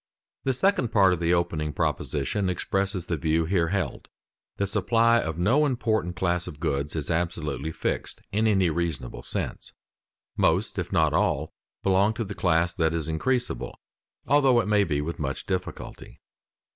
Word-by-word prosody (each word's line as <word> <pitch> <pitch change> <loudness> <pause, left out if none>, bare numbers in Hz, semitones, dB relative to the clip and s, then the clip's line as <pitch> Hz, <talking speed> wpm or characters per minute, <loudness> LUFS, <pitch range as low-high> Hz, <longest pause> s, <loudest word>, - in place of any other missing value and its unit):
The 135 - +2
second 135 - +1
part 95 -3 +5
of 90 - -2
the 85 0 +1
opening 75 -3 -1
proposition 90 +10 -1
expresses 95 0 -1
the 85 - -2
view 80 +2 +1
here 85 -1 +1
held: 95 +1 -2 0.5
the 100 - +1
supply 115 +4 +3
of 80 0 -4
no 115 - +3
important 110 - 0
class 90 0 0
of 75 - -8
goods 75 -2 -2
is 80 0 -2
absolutely 80 -3 -2
fixed, - - -3
in 110 +2 +2
any 95 -5 +3
reasonable 80 -7 -3
sense. - - -4 0.6
Most, - - +1
if - - -4
not - - +3
all, - - +1 0.3
belong 100 +3 +3
to 115 - -2
the 100 -1 -6
class 85 -2 +1
that 80 0 +1
is 80 -2 -2
increasable, 125 +11 -1 0.5
although 135 -2 +4
it 115 - -1
may 105 -1 +4
be 75 -6 -1
with 85 +3 -4
much 70 -2 -3
difficulty. 95 -1 -5
90 Hz, 160 wpm, -26 LUFS, 80-105 Hz, 0.6 s, part